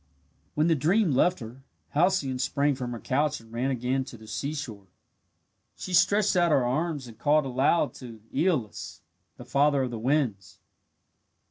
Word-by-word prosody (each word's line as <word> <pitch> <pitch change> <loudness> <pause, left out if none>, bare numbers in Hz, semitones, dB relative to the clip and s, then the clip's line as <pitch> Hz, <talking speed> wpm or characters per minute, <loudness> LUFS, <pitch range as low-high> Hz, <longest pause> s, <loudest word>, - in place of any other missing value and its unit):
When 150 - +2
the 165 - +4
dream 170 +5 +2
left 160 +5 +2
her, 120 +4 -10 0.3
Halcyone 150 -6 +1
sprang 140 +3 +1
from 125 -2 -5
her 120 - -5
couch 145 +5 0
and 115 0 -17
ran 125 +3 -1
again 130 +1 -1
to 125 - -10
the 110 - -14
seashore. 120 -5 -5 0.9
She 185 - -7
stretched 200 +3 +3
out 175 -1 +3
her 135 -5 +3
arms 145 +2 -1
and 115 -2 -13
called 150 0 +3
aloud 135 +2 +1
to 115 -4 -10
Aeolus, 155 - -1 0.3
the 125 - -10
father 140 +2 +2
of 125 - -3
the 115 - -5
winds. 120 -6 -1
135 Hz, 160 wpm, -27 LUFS, 120-155 Hz, 0.9 s, the